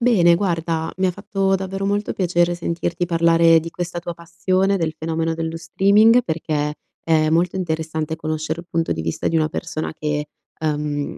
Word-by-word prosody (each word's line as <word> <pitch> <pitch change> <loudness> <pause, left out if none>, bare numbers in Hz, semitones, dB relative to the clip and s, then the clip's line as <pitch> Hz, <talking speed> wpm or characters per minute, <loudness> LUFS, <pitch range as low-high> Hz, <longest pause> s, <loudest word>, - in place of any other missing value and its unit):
Bene, 195 -8 +5
guarda, 165 -3 -1
mi 190 - +2
ha - - +2
fatto 195 0 -1
davvero 195 +1 -2
molto 205 +1 0
piacere 175 -2 +1
sentirti 170 0 -2
parlare 165 -1 +4
di 165 +1 -7
questa 175 0 -4
tua 175 0 -5
passione, 185 +4 0
del 165 -4 -1
fenomeno 165 0 -1
dello 165 0 -3
streaming 205 +8 +4
perché 155 -6 -2 0.3
è 155 -1 +2
molto 170 +3 +2
interessante 160 -3 -2
conoscere 155 +1 -3
il 170 - -17
punto 165 -1 0
di - - -4
vista 80 0 -3
di 165 - +1
una 155 -1 +2
persona 155 0 -4
che, 150 -1 -2 0.3
ehm, 150 -2 -2
165 Hz, 170 wpm, -21 LUFS, 160-180 Hz, 0.3 s, Bene